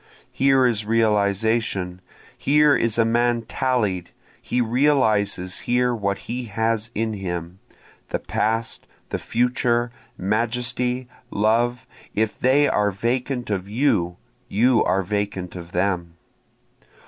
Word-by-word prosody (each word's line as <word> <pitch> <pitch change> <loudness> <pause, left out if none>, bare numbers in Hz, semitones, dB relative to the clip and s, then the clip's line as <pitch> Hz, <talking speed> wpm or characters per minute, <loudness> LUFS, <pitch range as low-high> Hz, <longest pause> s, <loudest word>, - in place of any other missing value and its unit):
Here 135 -1 +3
is 115 -3 +1
realization, 105 -3 +1 0.3
Here 150 +1 +4
is 115 -1 0
a 115 - +4
man 120 +1 +2
tallied 110 -7 -1 0.3
he 125 - -1
realizes 110 -7 +2
here 125 0 +3
what 100 -4 -1
he 125 +1 -4
has 110 +1 -1
in 110 +1 -1
him, 90 -2 -5 0.5
The - - 0
past, 115 +1 -2 0.2
the - - -2
future, 120 0 +1 0.3
majesty, 120 +4 -1 0.2
love 120 +4 +1 0.3
if 110 0 0
they 140 +3 +4
are 105 0 +2
vacant 120 +4 -2
of 95 -1 -2
you, 105 -8 +1 0.3
you 115 +3 +3
are 95 +1 +1
vacant 100 -2 -3
of 85 -1 -8
them. 90 -2 -1
110 Hz, 115 wpm, -23 LUFS, 100-125 Hz, 0.5 s, Here